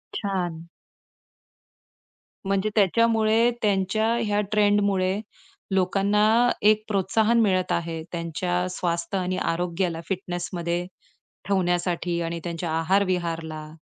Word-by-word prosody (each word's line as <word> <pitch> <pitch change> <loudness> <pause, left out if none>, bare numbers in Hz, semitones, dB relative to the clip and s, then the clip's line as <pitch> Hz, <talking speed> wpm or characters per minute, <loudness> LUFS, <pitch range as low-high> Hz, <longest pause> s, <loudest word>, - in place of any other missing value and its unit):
छान! 175 -5 -3 1.8
म्हणजे 195 +2 0
त्याच्यामुळे 225 +2 +3
त्यांच्या 205 +1 +1 0.2
ह्या 205 -1 0
ट्रेंडमुळे 205 -2 +2 0.5
लोकांना 195 +3 +2 0.4
एक 215 0 +3
प्रोत्साहन 215 +3 +2
मिळत 185 -3 +1
आहे 165 -1 -2
त्यांच्या 175 +1 -2
स्वास्थ्य 170 +1 -2
आणि 185 0 -1
आरोग्याला 170 -1 -1
फिटनेसमध्ये 175 -2 -3 0.6
ठेवण्यासाठी 175 -2 0
आणि 170 0 -3
त्यांच्या 170 -1 -4
आहार-विहारला 165 -3 -1
185 Hz, 85 wpm, -25 LUFS, 170-205 Hz, 1.8 s, त्याच्यामुळे